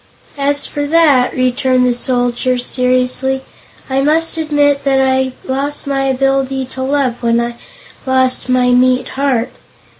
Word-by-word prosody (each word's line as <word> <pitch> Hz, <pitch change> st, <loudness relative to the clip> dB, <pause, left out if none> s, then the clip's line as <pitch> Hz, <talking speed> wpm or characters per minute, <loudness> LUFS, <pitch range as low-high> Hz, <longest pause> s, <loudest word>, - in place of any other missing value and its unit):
"As 285 Hz, +1 st, 0 dB
for 290 Hz, 0 st, -4 dB
that," 290 Hz, -5 st, +3 dB
returned 255 Hz, 0 st, +1 dB
the 250 Hz, -, +2 dB
Soldier, 245 Hz, 0 st, 0 dB
seriously, 255 Hz, +1 st, 0 dB, 0.5 s
"I 265 Hz, 0 st, 0 dB
must 320 Hz, +4 st, +1 dB
admit 290 Hz, -3 st, +1 dB
I 265 Hz, -1 st, +2 dB
lost 275 Hz, +2 st, -3 dB
my 275 Hz, -1 st, -1 dB
ability 270 Hz, 0 st, 0 dB
to 260 Hz, -, -6 dB
love 260 Hz, -3 st, -1 dB
when 235 Hz, -1 st, +2 dB
I 235 Hz, 0 st, -3 dB, 0.5 s
lost 260 Hz, -1 st, +1 dB
my 250 Hz, -1 st, +3 dB
meat 255 Hz, +1 st, +2 dB
heart. 265 Hz, -4 st, -1 dB
260 Hz, 130 wpm, -15 LUFS, 250-275 Hz, 0.5 s, that